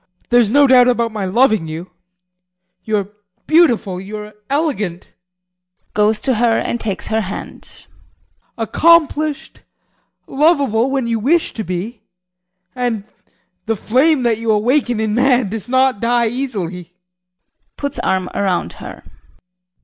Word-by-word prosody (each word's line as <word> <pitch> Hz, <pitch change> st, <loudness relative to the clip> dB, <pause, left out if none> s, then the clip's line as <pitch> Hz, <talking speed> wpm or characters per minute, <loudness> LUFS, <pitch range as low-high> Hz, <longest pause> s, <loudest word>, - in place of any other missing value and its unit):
There's 240 Hz, -3 st, +4 dB
no 285 Hz, +5 st, +5 dB
doubt 255 Hz, -2 st, +6 dB
about 235 Hz, -2 st, +1 dB
my 210 Hz, -3 st, -3 dB
loving 220 Hz, -3 st, +2 dB
you 160 Hz, +3 st, -7 dB, 0.9 s
you 215 Hz, -1 st, 0 dB
are 200 Hz, -1 st, -3 dB, 0.4 s
beautiful, 235 Hz, -, +2 dB
you 205 Hz, +3 st, -7 dB
are 210 Hz, 0 st, -9 dB, 0.2 s
elegant 265 Hz, -, -2 dB, 0.8 s
[Goes 210 Hz, +1 st, +2 dB
to 265 Hz, -, +1 dB
her 230 Hz, -2 st, +3 dB
and 235 Hz, -, -2 dB
takes 205 Hz, -5 st, -3 dB
her 220 Hz, 0 st, +1 dB
hand] 195 Hz, -1 st, -9 dB, 0.7 s
accomplished, 310 Hz, +4 st, +1 dB, 0.6 s
lovable 275 Hz, -5 st, +2 dB
when 270 Hz, -2 st, -1 dB
you 230 Hz, -1 st, -1 dB
wish 315 Hz, +9 st, +1 dB
to 220 Hz, -, -4 dB
be, 195 Hz, +5 st, -5 dB, 0.7 s
and 240 Hz, -5 st, -2 dB, 0.6 s
the 225 Hz, -, +1 dB
flame 260 Hz, +7 st, +2 dB
that 230 Hz, -2 st, +1 dB
you 230 Hz, 0 st, -3 dB
awaken 240 Hz, +2 st, +1 dB
in 220 Hz, -1 st, -1 dB
man 250 Hz, -2 st, +2 dB
does 220 Hz, +2 st, -6 dB
not 260 Hz, -3 st, +2 dB
die 235 Hz, +1 st, +1 dB
easily. 185 Hz, -9 st, -5 dB, 0.8 s
[Puts 285 Hz, -1 st, -4 dB
arm 185 Hz, -1 st, 0 dB
around 190 Hz, -3 st, -1 dB
her. -, -, -9 dB
230 Hz, 130 wpm, -17 LUFS, 210-265 Hz, 0.9 s, doubt